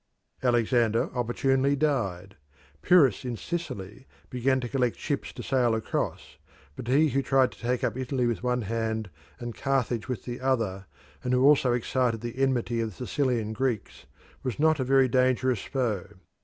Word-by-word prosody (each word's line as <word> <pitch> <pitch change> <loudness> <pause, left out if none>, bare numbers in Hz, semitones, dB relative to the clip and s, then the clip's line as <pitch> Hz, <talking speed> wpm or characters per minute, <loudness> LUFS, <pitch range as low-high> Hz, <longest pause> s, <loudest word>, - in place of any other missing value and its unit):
Alexander 120 -2 +2
opportunely 135 +3 +1
died. 100 -11 -1 0.5
Pyrrhus 150 - +4
in 125 -3 -4
Sicily 130 - -6 0.2
began 130 +1 +1
to 125 - -4
collect 125 -2 0
ships 145 -2 -3
to - - -7
sail 125 -4 +2
across, 110 - -3 0.4
but 115 - -8
he 150 +5 +4
who 135 0 +1
tried 135 -1 +3
to - - -16
take 125 +1 -1
up 120 -2 0
Italy 130 -1 -1
with 120 -1 -1
one 125 -1 0
hand 110 -1 -2 0.3
and 120 -1 -5
Carthage 125 -4 -1
with 125 -3 -4
the 120 0 -5
other, 110 -8 -1 0.4
and 125 - 0
who 125 0 +3
also 135 -3 +5
excited 120 -1 0
the 120 +2 -6
enmity 125 -3 +1
of 115 - -1
the 115 +5 -8
Sicilian 120 -7 0
Greeks, 110 - -3 0.3
was 125 -6 -3
not 155 -1 +3
a - - +1
very 135 0 +4
dangerous 130 -2 +2
foe. 115 -9 -2
125 Hz, 165 wpm, -27 LUFS, 115-135 Hz, 0.5 s, also